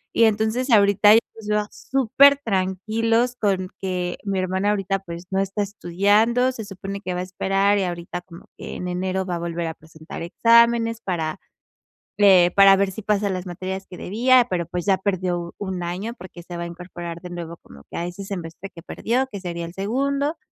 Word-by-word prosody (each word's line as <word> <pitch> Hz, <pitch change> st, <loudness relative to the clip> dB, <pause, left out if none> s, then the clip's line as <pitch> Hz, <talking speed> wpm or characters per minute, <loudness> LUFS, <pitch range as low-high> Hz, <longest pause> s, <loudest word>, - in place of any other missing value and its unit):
Y 230 Hz, -, +6 dB
entonces 220 Hz, +4 st, 0 dB
ahorita 205 Hz, 0 st, +6 dB
yo -, -, +7 dB, 0.2 s
los 220 Hz, -2 st, -10 dB
veo 210 Hz, 0 st, 0 dB
supertranquilos 230 Hz, -3 st, +2 dB
con 190 Hz, -4 st, 0 dB
que 180 Hz, -2 st, -3 dB
mi 200 Hz, -2 st, -2 dB
hermana 190 Hz, +2 st, 0 dB
ahorita, 195 Hz, -1 st, -1 dB
pues, 170 Hz, -2 st, -9 dB
no 190 Hz, -, +1 dB
está 195 Hz, +2 st, -1 dB
estudiando, 205 Hz, +6 st, +2 dB
se 225 Hz, -4 st, -7 dB
supone 195 Hz, 0 st, -7 dB
que 180 Hz, -2 st, -4 dB
va 180 Hz, -, -2 dB
a -, -, -2 dB
esperar, 195 Hz, +2 st, +1 dB
y -, -, +1 dB
ahorita 175 Hz, 0 st, -4 dB
como 175 Hz, -1 st, -14 dB
que -, -, -7 dB
en 180 Hz, -, -5 dB
enero 185 Hz, +1 st, -2 dB
va 180 Hz, -2 st, -2 dB
a -, -, -4 dB
volver 170 Hz, 0 st, -3 dB
a 160 Hz, -, -4 dB
presentar 160 Hz, 0 st, -11 dB
exámenes 230 Hz, +4 st, +4 dB
para 165 Hz, -6 st, -3 dB, 1.2 s
para, 195 Hz, -1 st, +8 dB
eh, 195 Hz, -, +4 dB
ver 195 Hz, -1 st, +1 dB
si 220 Hz, -, -7 dB
pasan 205 Hz, -1 st, 0 dB
las 185 Hz, 0 st, -4 dB
materias 190 Hz, +2 st, -5 dB
que 180 Hz, -, -9 dB
debía, 245 Hz, +5 st, +3 dB
pero, 170 Hz, -2 st, -2 dB
pues, 180 Hz, +1 st, -4 dB
ya 195 Hz, -2 st, +3 dB
perdió 185 Hz, -3 st, -1 dB
u 170 Hz, 0 st, -7 dB
un 190 Hz, -3 st, -4 dB
año, 185 Hz, +7 st, -4 dB
porque 180 Hz, -5 st, -11 dB
se 175 Hz, 0 st, -8 dB
va 170 Hz, -, -4 dB
a -, -, -4 dB
incorporar 170 Hz, -1 st, -8 dB
de 180 Hz, -, -8 dB
nuevo 170 Hz, -1 st, -6 dB
como 70 Hz, -, -16 dB
que -, -, -10 dB
a 170 Hz, -, -2 dB
ese 180 Hz, +3 st, -7 dB
semestre 180 Hz, -1 st, -7 dB
que 170 Hz, -3 st, -13 dB
perdió, 255 Hz, +8 st, -1 dB
que 200 Hz, -, -6 dB
sería 170 Hz, -2 st, -4 dB
el 170 Hz, -, -9 dB
segundo. 275 Hz, -, -1 dB
195 Hz, 200 wpm, -23 LUFS, 175-215 Hz, 1.2 s, para